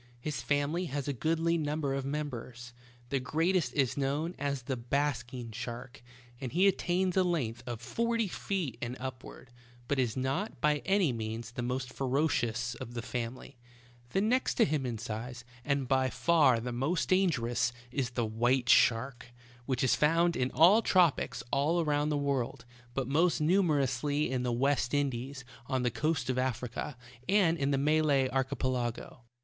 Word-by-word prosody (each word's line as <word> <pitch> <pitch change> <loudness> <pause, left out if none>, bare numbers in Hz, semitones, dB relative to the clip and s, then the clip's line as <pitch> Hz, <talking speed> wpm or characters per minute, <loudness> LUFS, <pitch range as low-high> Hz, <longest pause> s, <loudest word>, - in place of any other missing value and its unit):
His 150 +4 -4
family 145 +5 0
has 145 -3 -4
a 145 - 0
goodly 165 +5 +1
number 150 -2 -1
of 135 -1 -2
members. 125 -4 -5 0.4
The 135 - 0
greatest 160 +2 +1
is 135 -4 +2
known 145 +5 -1
as 140 -2 -2
the 130 +2 -2
''basking 125 -2 -2
shark," 120 +2 -7 0.4
and 130 -3 -4
he 185 +4 +4
attains 185 -1 +1
a 190 - +4
length 130 -10 -1
of 120 -2 -5
forty 230 - 0
feet 180 - -3
and 120 +1 -4
upward, 130 -1 -8 0.4
but 140 +1 0
is 120 -1 0
not, 135 +12 -2
by 150 0 +3
any 190 -8 +3
means, 110 0 -5
the 120 - -5
most 125 +1 -3
ferocious 125 -4 0
of 120 0 -8
the 120 - -3
fam 120 0 -3
ily. 130 0 -13 0.5
The 195 - +1
next 245 +5 +1
to 230 - +5
him 150 -7 -1
in 120 -2 -3
size, 120 +2 -6 0.2
and 140 -2 0
by 130 0 +2
far 145 -6 +3
the 125 +2 -4
most 135 +9 -1
dangerous, 130 -11 +2 0.2
is 130 -2 -1
the 120 -1 -1
white 120 +3 +1
shark, 120 +2 +3 0.4
which 130 -2 0
is 130 - +4
found 165 +3 +3
in 125 - +1
the 180 - +6
tropics 180 -8 +2
all 150 +5 +2
around 150 -2 +1
the 150 - +1
world, 140 -5 -2 0.3
but 135 -2 -1
most 165 +6 +2
numer 165 -1 +3
ously 145 +3 -1
in 130 -1 0
the 125 -1 -1
West 135 +1 +1
Indies, 135 -1 -2 0.2
on 130 -2 0
the 125 - +1
coast 140 +2 -1
of 130 0 0
Africa, 125 +1 -3 0.3
and 190 -5 +4
in 140 0 +1
the 140 - +2
Malay 145 -2 +3
Archipelago. 130 -2 -2
135 Hz, 170 wpm, -31 LUFS, 125-155 Hz, 0.5 s, the